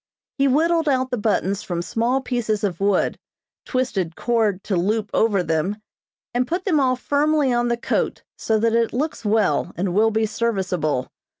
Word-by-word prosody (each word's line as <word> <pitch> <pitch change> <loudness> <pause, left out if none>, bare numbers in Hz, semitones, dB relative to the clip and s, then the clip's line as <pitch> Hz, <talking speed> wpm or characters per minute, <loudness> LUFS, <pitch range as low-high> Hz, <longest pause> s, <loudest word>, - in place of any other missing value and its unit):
He 275 - +4
whittled 320 +3 +2
out 260 -1 +1
the - - +1
buttons 200 -2 0
from 175 -1 -3
small 240 +7 0
pieces 240 -5 -2
of 185 -5 -1
wood, 200 -1 +1 0.5
twisted 200 -10 -1
cord 220 -5 0
to 200 - -1
loop 210 +4 0
over 205 -5 +2
them, 165 +4 0 0.6
and 250 +1 0
put 355 +5 -2
them 330 -7 +2
all 255 -2 +2
firmly 290 +1 +1
on 240 0 +1
the 235 0 0
coat - - -1
so 220 - 0
that 225 +1 +1
it 230 -1 +1
looks 300 +4 -2
well, 210 -4 +1
and 180 0 -1
will 215 +3 +4
be 220 0 +1
serviceable. 185 - -1
225 Hz, 175 wpm, -22 LUFS, 195-255 Hz, 0.6 s, He